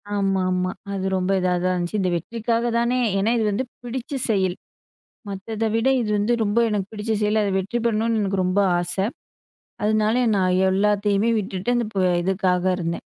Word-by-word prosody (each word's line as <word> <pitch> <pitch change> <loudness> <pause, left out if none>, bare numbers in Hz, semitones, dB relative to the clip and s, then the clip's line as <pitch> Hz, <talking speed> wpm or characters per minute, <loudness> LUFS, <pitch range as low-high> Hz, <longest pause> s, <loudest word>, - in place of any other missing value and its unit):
ஆமாமா. 185 -2 0 0.2
அது 190 -1 -3
ரொம்ப 185 +1 0
இதா 180 0 +1
தான் 185 0 +2
இருந்துச்சு. 175 +4 -2
இந்த 185 - +1
வெற்றிக்காக 230 +6 -2
தானே 240 +2 +1 0.2
ஏன்னா 210 +4 +2
இது 220 - +1
வந்து 245 +6 -1 0.2
பிடிச்ச 245 +2 -6 0.2
செயல். 190 -3 +1 0.7
மத்தத 210 +3 -4
விட 230 +3 +2
இது 215 -2 -2
வந்து 225 +4 +2
ரொம்ப 205 +3 +1
எனக்கு 200 -2 -2
பிடிச்ச 215 +1 -3
செயல். 210 +1 +2
அதுல 195 -2 0
வெற்றி 195 +6 -2
பெறணுண்னு 225 0 +1
எனக்கு 195 -1 0
ரொம்ப 185 +3 +2 0.2
ஆச. 175 0 -2 0.9
அதுனால 215 +3 +2
நான் 185 -1 +2 0.2
எல்லாத்தையுமே 205 +2 +2
விட்டுட்டு 195 +4 -2
அந்த 240 -2 +1
ப - - -3 0.3
இதுக்காக 185 -1 +1
இருந்தேன். 170 -1 -3
205 Hz, 165 wpm, -23 LUFS, 185-225 Hz, 0.9 s, தான்